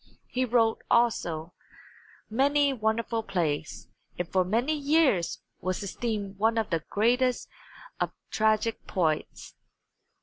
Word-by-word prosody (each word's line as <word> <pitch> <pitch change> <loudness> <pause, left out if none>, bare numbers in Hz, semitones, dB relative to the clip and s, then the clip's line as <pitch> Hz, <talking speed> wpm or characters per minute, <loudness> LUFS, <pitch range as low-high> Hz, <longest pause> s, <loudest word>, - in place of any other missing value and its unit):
He 255 +1 0
wrote, 230 -2 +2
also, 175 -9 +1 0.7
many 280 +4 +2
wonderful 225 0 0
plays, 165 -8 -2 0.3
and 175 - -2
for 185 +2 +2
many 230 +11 +1
years 285 - +2 0.2
was 185 +2 -2
esteemed 200 -1 -4
one 225 +2 +2
of 220 -3 -1
the 165 -2 0
greatest 245 +4 +2 0.5
of - - 0 0.2
tragic 220 +1 +1
poets. 160 -5 -1
220 Hz, 110 wpm, -28 LUFS, 185-245 Hz, 0.7 s, wrote